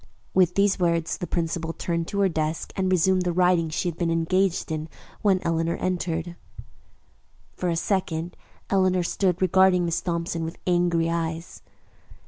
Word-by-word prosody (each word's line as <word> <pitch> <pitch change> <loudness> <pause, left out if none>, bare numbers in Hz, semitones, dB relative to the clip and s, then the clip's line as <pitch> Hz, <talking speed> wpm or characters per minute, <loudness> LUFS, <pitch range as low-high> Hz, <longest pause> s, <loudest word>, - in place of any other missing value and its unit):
With 180 -2 +3
these 200 0 +2
words 170 -2 0
the 175 - -4
principal 165 -1 -2
turned 170 -1 -2
to 200 - -1
her 195 - +4
desk 160 -2 -2
and 190 -1 0
resumed 185 +1 +3
the 180 -1 0
writing 175 -2 +2
she 160 +3 -2
had 170 -2 -4
been 170 -2 +1
engaged 175 +2 +1
in 155 0 -3 0.3
when 200 -3 +4
Eleanor 165 0 0
entered. 175 -2 -2 1.2
For 180 - -2
a 170 - 0
second, 170 -2 -1 0.4
Eleanor 185 -2 +3
stood 180 0 0
regarding 185 -1 +4
Miss 170 0 -1
Thompson 170 -1 -2
with 165 +1 -5
angry 175 -2 +2
eyes. 165 0 -3
175 Hz, 155 wpm, -25 LUFS, 165-185 Hz, 1.2 s, her